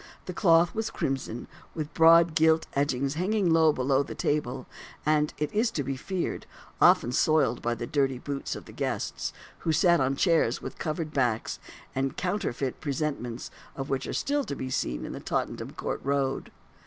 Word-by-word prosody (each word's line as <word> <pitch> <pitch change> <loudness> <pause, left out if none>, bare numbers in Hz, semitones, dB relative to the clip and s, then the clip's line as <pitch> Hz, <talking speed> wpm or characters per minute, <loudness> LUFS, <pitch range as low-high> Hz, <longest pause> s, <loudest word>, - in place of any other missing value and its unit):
The 180 - -5
cloth 170 -2 +4
was 220 0 -2
crimson, 130 -3 -3 0.3
with 155 -2 -4
broad 165 0 +6
gilt 160 0 +4
edgings 140 -1 0
hanging 185 +1 +1
low 160 -1 +6
beneath 135 +1 +1
the - - -6
table, 135 -3 -1 0.4
and, 150 0 +2
it 150 - -2
is 220 +3 +2
to 150 -10 -2
be 135 +1 -2
feared, 185 +7 -3 0.3
often 120 - +6
soiled 150 -3 +2
by 120 0 0
the 120 +1 -4
dirty 135 -1 +1
boots 140 +2 -4
of - - -9
the - - -12
guests, - - -3 0.3
who 165 - 0
sat 170 +2 +4
on 135 0 +1
chairs 160 -7 +2
with - - -8
covered 155 0 -3
backs, 120 -5 0 0.3
the 135 0 0
counterfeit 160 -9 -2
presentments 140 -5 -3 0.2
of 135 0 -5
which 135 - -1
are - - -3
still 285 0 0
to 140 - -4
be 130 -1 -5
seen - - -1
in - - -6
the - - -6
Tottenham - - -3
Court - - -4
Road. 140 -1 0
145 Hz, 180 wpm, -28 LUFS, 130-165 Hz, 0.4 s, broad